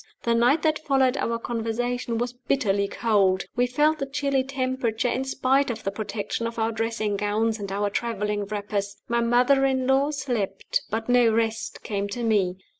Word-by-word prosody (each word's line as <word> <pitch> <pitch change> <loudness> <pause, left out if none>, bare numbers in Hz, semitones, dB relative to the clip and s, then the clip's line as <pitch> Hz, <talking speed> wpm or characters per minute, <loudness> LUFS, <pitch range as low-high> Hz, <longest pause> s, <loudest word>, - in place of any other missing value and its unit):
The 235 - +2
night 245 +7 +3
that 310 -1 +2
followed 270 -3 +2
our 230 -3 -1
conversation 235 +1 -2
was 240 +1 -2
bitterly 235 -6 0
cold. 200 -5 +2
We 245 +1 +2
felt 300 +5 +2
the 275 - -2
chilly 275 -1 0
temperature, 255 -3 -1
in 260 +2 -1
spite 265 +1 +1
of 225 -2 -4
the 195 - -1
protection 215 +2 -3
of 230 - -7
our 225 0 +1
dressing 220 -2 -1
gowns 215 +2 0
and 200 -1 -5
our 200 +1 -1
traveling 210 -2 -2
wrappers. 205 -1 -3
My 235 0 +1
mother 250 +4 +3
in 260 -1 +1
law 270 +2 +3
slept, 245 -10 -2
but 225 +1 -3
no 245 -2 +5
rest 225 0 -1
came 200 -1 -2
to 235 +4 -4
me. 200 -5 +2
230 Hz, 180 wpm, -25 LUFS, 210-260 Hz, -, no